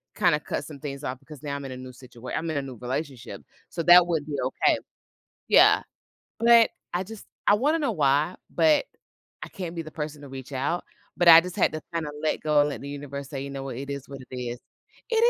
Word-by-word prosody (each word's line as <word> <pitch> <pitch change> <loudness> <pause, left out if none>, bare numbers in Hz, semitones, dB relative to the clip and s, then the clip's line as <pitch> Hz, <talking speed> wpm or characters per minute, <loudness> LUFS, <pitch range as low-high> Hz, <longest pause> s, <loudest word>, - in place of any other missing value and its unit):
kinda 170 -7 +3
cut - - -4
some 150 -3 -10
things 140 0 -6
off 130 -1 -4
because 145 0 -13
now 140 -1 -3
I'm 140 - -6
in 135 - -6
a 130 - -6
new 130 0 -9
situat 125 -1 -9
I'm 165 +1 -3
in 155 - -2
a - - 0
new 135 -2 -8
relationship. 130 +1 -5 0.3
So 165 - -3
that 175 +1 +8
wouldn't 160 -4 -1
be 145 -2 -3
okay. 130 +1 +2 0.7
Yeah. - - +6 0.6
But 235 -1 +6 0.2
I 180 - +1
just 220 +1 -10 0.2
I 205 - +6
wanna 290 +9 +2
know 285 - 0
why, 145 +4 +2 0.2
but 310 +7 +4 0.6
I - - -5
can't 175 -3 -6
be 165 - -2
the 155 - -10
person 150 -1 -5
to 140 - -10
reach 135 +1 -9
out, 140 +7 -1 0.3
But 175 - +4
I 165 0 +11
just 180 0 -7
had - - +3
to 155 - -4
kinda 155 -3 -2
let 155 - 0
go 150 -1 +3
and 145 - +3
let - - -6
the 140 - -7
universe 140 -1 -6
say, 135 -3 -4
you 140 - -6
know 135 -1 -5
what? 135 -3 -5
It 140 +1 -6
is 140 -1 -6
what 140 -1 -8
it 130 - -7
is 120 -1 -4 0.5
It 460 - +1
145 Hz, 240 wpm, -26 LUFS, 135-165 Hz, 0.7 s, I